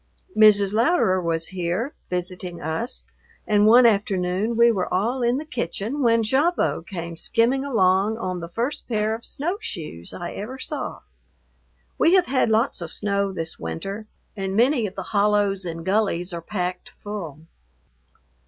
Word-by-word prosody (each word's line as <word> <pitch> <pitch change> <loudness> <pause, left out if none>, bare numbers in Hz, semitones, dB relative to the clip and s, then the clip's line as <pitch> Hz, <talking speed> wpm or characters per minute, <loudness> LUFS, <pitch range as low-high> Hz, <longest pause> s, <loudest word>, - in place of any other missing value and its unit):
Mrs. 205 -2 +6
Louderer 225 - +3
was 165 -1 -2
here 185 - -2 0.2
visiting 180 -1 -4
us, 160 +12 -3 0.4
and 210 0 +4
one 240 +3 +7
afternoon 200 0 +1
we 235 0 +6
were 190 -5 -2
all 230 +8 0
in 240 +1 +2
the 300 - -5
kitchen 235 - -3
when 230 -2 +3
Gavotte 265 - +1
came 170 -3 -6
skimming 240 +9 +1
along 205 -4 +2
on 185 -5 -3
the 170 0 -7
first 240 +10 -3
pair 215 -2 0
of 230 +1 -6
snowshoes 200 - -4
I 175 -1 -6
ever 235 +6 -6
saw. 280 +1 -5 1.0
We 345 - +5
have 370 -2 +4
had 260 -5 +1
lots 220 -1 +1
of 170 - -4
snow 200 +1 0
this 165 -3 -2
winter, 195 - -5 0.3
and 195 -1 -3
many 240 0 +3
of 195 - -10
the 190 - -4
hollows 205 -1 +1
and 165 -1 -5
gullies 190 -3 0
are 170 - -4
packed 180 0 -4
full. 175 -8 -6
205 Hz, 155 wpm, -23 LUFS, 180-235 Hz, 1.0 s, one